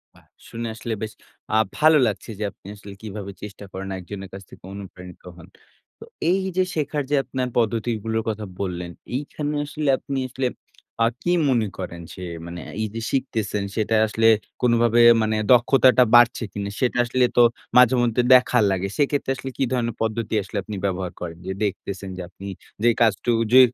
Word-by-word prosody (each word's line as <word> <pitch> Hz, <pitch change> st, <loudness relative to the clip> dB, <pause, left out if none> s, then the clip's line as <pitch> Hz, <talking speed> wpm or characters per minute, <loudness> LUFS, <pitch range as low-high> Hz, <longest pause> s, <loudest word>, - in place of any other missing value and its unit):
বাহ! -, -, -22 dB, 0.2 s
শুনে 115 Hz, 0 st, -5 dB
আসলে 115 Hz, +1 st, -4 dB
বেশ 110 Hz, -1 st, -4 dB, 0.4 s
আ -, -, +5 dB, 0.2 s
ভালো 155 Hz, 0 st, +6 dB
লাগছে 100 Hz, +1 st, -4 dB
যে, 110 Hz, -, -2 dB
আপনি -, -, -39 dB
আসলে 100 Hz, -1 st, -11 dB
কিভাবে 105 Hz, -2 st, -6 dB
চেষ্টা 105 Hz, 0 st, -8 dB
করেন 95 Hz, +1 st, -6 dB
একজনের 95 Hz, +1 st, -8 dB
কাছ 95 Hz, -, -7 dB
থেকে -, -, -15 dB
অনুপ্রাণিত 90 Hz, -3 st, -10 dB
হন। 85 Hz, -, -13 dB, 0.5 s
তো -, -, -10 dB, 0.3 s
এইযে 190 Hz, -1 st, +1 dB
শেখার 150 Hz, -1 st, -1 dB
যে, 145 Hz, -, +2 dB
আপনার 130 Hz, 0 st, -3 dB
পদ্ধতিগুলোর 115 Hz, -1 st, 0 dB
কথা 110 Hz, -1 st, -4 dB, 0.2 s
বললেন, 90 Hz, -2 st, -4 dB, 0.2 s
এইখানে 145 Hz, +2 st, -3 dB
আসলে 150 Hz, 0 st, -2 dB
আপনি 135 Hz, 0 st, -4 dB
আসলে 130 Hz, +1 st, -1 dB, 0.6 s
আ -, -, +4 dB, 0.2 s
কি 175 Hz, -, +1 dB, 0.2 s
মনে 115 Hz, -4 st, +2 dB
করেন? 85 Hz, -2 st, -6 dB
যে, 95 Hz, -, -9 dB, 0.2 s
মানে 85 Hz, 0 st, -7 dB, 0.2 s
এইযে 110 Hz, +1 st, -3 dB
শিখতেছেন, 110 Hz, -6 st, -1 dB
সেটা 110 Hz, 0 st, +1 dB
আসলে 115 Hz, +1 st, +2 dB, 0.3 s
কোনভাবে 120 Hz, -1 st, +4 dB, 0.2 s
মানে 110 Hz, 0 st, +1 dB, 0.2 s
দক্ষতাটা 125 Hz, +1 st, +6 dB
বাড়ছে 120 Hz, 0 st, +5 dB
কিনা? 100 Hz, -1 st, -4 dB
সেটা 125 Hz, -1 st, +1 dB
আসলে 125 Hz, +1 st, +2 dB
তো -, -, +8 dB, 0.4 s
মাঝেমধ্যে 125 Hz, -1 st, +5 dB
দেখা 125 Hz, 0 st, +4 dB
লাগে। 95 Hz, 0 st, -1 dB
সেক্ষেত্রে 145 Hz, -2 st, +1 dB
আসলে 135 Hz, 0 st, -6 dB
কী -, -, +1 dB
ধরনের 115 Hz, -3 st, -1 dB
পদ্ধতি 110 Hz, 0 st, -2 dB
আসলে 100 Hz, -, -6 dB
আপনি 105 Hz, -, -6 dB
ব্যবহার 95 Hz, -2 st, -2 dB
করেন? 85 Hz, -1 st, -6 dB
যে, 95 Hz, -, -3 dB
দেখতেছেন 100 Hz, -1 st, -4 dB
যে, -, -, -5 dB
আপনি 100 Hz, +1 st, -10 dB, 0.4 s
যে, 120 Hz, -, +5 dB
কাজটুকু 115 Hz, +1 st, +2 dB
যে, 130 Hz, -, +9 dB
115 Hz, 170 wpm, -23 LUFS, 100-125 Hz, 0.6 s, যে